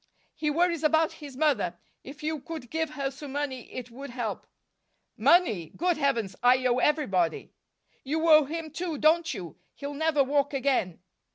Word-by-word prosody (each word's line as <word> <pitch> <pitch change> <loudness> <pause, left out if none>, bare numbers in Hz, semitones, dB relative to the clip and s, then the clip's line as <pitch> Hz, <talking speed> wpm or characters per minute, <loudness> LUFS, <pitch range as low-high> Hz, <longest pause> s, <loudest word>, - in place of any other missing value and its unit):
"He 305 - -2
worries 335 +1 +1
about 315 +1 +3
his 280 -3 -9
mother. 280 - +1 0.3
If 285 +3 -11
you 310 0 -2
could 310 -4 -8
give 320 -1 -1
her 275 -1 -2
some 275 0 -9
money, 275 -4 -4
it 250 -1 -7
would 275 +4 -8
help." 235 -3 -4 0.7
"Money! 220 - +3
Good 350 -1 +1
Heavens 235 -10 0
I 255 +1 +4
owe 250 0 +3
everybody." 200 - +1 0.5
"You 315 +4 -1
owe 305 -2 +7
him 320 +2 -5
too, 330 0 -3
don't 325 +3 +3
you? 180 - -7 0.2
He'll 285 0 -6
never 305 -1 +2
walk 285 +1 0
again." 255 -11 0
285 Hz, 165 wpm, -27 LUFS, 255-315 Hz, 0.7 s, owe